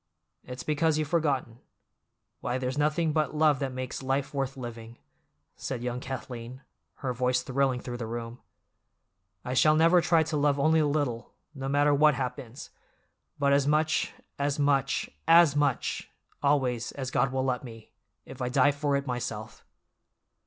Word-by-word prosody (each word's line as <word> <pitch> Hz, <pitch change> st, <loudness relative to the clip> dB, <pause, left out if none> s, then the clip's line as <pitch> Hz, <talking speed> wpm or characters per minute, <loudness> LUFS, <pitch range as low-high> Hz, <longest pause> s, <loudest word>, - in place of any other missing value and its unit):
It's 125 Hz, 0 st, -8 dB
because 155 Hz, +1 st, +1 dB
you've 155 Hz, -1 st, -1 dB
forgotten. 140 Hz, -8 st, 0 dB, 0.8 s
Why, 125 Hz, -, -2 dB
there's 130 Hz, 0 st, -2 dB
nothing 155 Hz, +2 st, +1 dB
but 155 Hz, -1 st, 0 dB
love 150 Hz, -3 st, +3 dB
that 135 Hz, -2 st, -2 dB
makes 130 Hz, +1 st, -5 dB
life 135 Hz, +2 st, -1 dB
worth 135 Hz, -1 st, -2 dB
living!" 120 Hz, -2 st, -8 dB, 0.6 s
said 125 Hz, -3 st, -5 dB
young 125 Hz, 0 st, -2 dB
Kathleen, 125 Hz, -1 st, -7 dB, 0.4 s
her 125 Hz, -, 0 dB
voice 125 Hz, +1 st, 0 dB
thrilling 135 Hz, -1 st, 0 dB
through 120 Hz, -1 st, -6 dB
the 115 Hz, -2 st, -5 dB
room. 115 Hz, +1 st, -6 dB, 1.1 s
"I 125 Hz, -, -3 dB
shall 155 Hz, +4 st, +5 dB
never 165 Hz, +3 st, +5 dB
try 165 Hz, -1 st, +3 dB
to 155 Hz, -1 st, -2 dB
love 145 Hz, -1 st, +2 dB
only 160 Hz, +3 st, +4 dB
a 150 Hz, -, +2 dB
little, 145 Hz, -6 st, -2 dB, 0.2 s
no 135 Hz, -2 st, -5 dB
matter 145 Hz, +1 st, +3 dB
what 150 Hz, 0 st, +5 dB
happens, 125 Hz, -1 st, -6 dB, 0.7 s
but 140 Hz, -1 st, +2 dB
as 140 Hz, 0 st, +3 dB
much, 155 Hz, +1 st, +1 dB, 0.3 s
as 140 Hz, 0 st, 0 dB
much, 140 Hz, -3 st, +1 dB, 0.2 s
as 165 Hz, -3 st, +6 dB
much, 145 Hz, -3 st, 0 dB, 0.3 s
always, 130 Hz, -5 st, +1 dB
as 130 Hz, -2 st, -5 dB
God 130 Hz, -1 st, +1 dB
will 130 Hz, 0 st, -1 dB
let 125 Hz, -1 st, -1 dB
me, 115 Hz, -3 st, -11 dB, 0.3 s
if 130 Hz, -, -10 dB
I 125 Hz, -, -1 dB
die 135 Hz, +2 st, +4 dB
for 145 Hz, 0 st, -1 dB
it 140 Hz, 0 st, -1 dB
myself!" 120 Hz, -4 st, -5 dB
135 Hz, 160 wpm, -28 LUFS, 125-145 Hz, 1.1 s, as